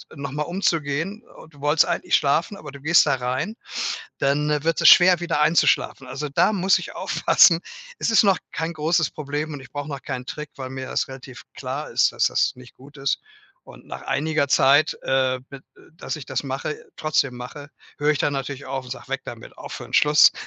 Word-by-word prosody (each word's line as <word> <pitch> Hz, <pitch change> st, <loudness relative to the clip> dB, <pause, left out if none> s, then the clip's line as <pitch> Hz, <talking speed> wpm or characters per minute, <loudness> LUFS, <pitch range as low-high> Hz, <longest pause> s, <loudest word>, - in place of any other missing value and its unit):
noch 140 Hz, -1 st, -6 dB
mal 150 Hz, +2 st, -2 dB
umzugehen 170 Hz, -, -2 dB
o -, -, -13 dB
du 145 Hz, -3 st, -20 dB
wolltest 150 Hz, +2 st, +3 dB
eigentlich -, -, 0 dB
schlafen, 160 Hz, +7 st, +1 dB
aber 150 Hz, -2 st, -10 dB
du 140 Hz, -1 st, -12 dB
gehst 165 Hz, +3 st, +5 dB
da 135 Hz, -, +3 dB
rein, 130 Hz, -, -3 dB, 0.6 s
dann 150 Hz, +2 st, +1 dB
wird 165 Hz, -1 st, +1 dB
es -, -, +7 dB
schwer 180 Hz, -1 st, +7 dB
wieder 165 Hz, -3 st, -1 dB
einzuschlafen. 150 Hz, -4 st, +2 dB
Also, 140 Hz, +4 st, -5 dB
da 145 Hz, +9 st, +2 dB
muss 190 Hz, -1 st, +3 dB
ich -, -, -8 dB
aufpassen, 170 Hz, -2 st, +4 dB, 0.4 s
es -, -, 0 dB
ist 225 Hz, -, +6 dB
noch 195 Hz, -2 st, +4 dB
kein 165 Hz, 0 st, -3 dB
großes 155 Hz, 0 st, +1 dB
Problem 150 Hz, +1 st, -4 dB
und 145 Hz, -, -7 dB
ich 130 Hz, -, -14 dB
brauche 145 Hz, +1 st, -5 dB
noch 140 Hz, -3 st, -6 dB
keinen 125 Hz, 0 st, -5 dB
Trick, 150 Hz, -1 st, -7 dB
weil 130 Hz, -1 st, -6 dB
mir 130 Hz, 0 st, -6 dB
das -, -, -1 dB
relativ 130 Hz, -1 st, -11 dB
klar -, -, -5 dB
ist, -, -, +3 dB
dass -, -, +2 dB
das -, -, +1 dB
nicht 125 Hz, -1 st, -15 dB
gut 140 Hz, +3 st, -16 dB
ist. 135 Hz, 0 st, -1 dB, 0.4 s
Und -, -, -15 dB
nach -, -, -8 dB
einiger 145 Hz, +2 st, 0 dB
Zeit, 140 Hz, +3 st, +4 dB
äh, 130 Hz, -1 st, +1 dB
b 140 Hz, -, -9 dB
äh, -, -, -14 dB, 0.3 s
dass 165 Hz, -, -6 dB
ich 145 Hz, -, -9 dB
das 130 Hz, 0 st, -2 dB
mache 140 Hz, -, -5 dB
trotzdem 140 Hz, -4 st, 0 dB
mache, 145 Hz, +4 st, -9 dB, 0.3 s
höre 145 Hz, +1 st, +2 dB
ich 145 Hz, -, +1 dB
dann 145 Hz, -, 0 dB
natürlich 135 Hz, 0 st, -5 dB
auf 135 Hz, -1 st, -4 dB
und 125 Hz, -, -12 dB
sage: 125 Hz, -1 st, -8 dB
„Weg -, -, -3 dB
damit, -, -, -10 dB
aufhören, -, -, -8 dB
Schluss“, 150 Hz, +1 st, +6 dB
145 Hz, 210 wpm, -23 LUFS, 135-160 Hz, 0.6 s, es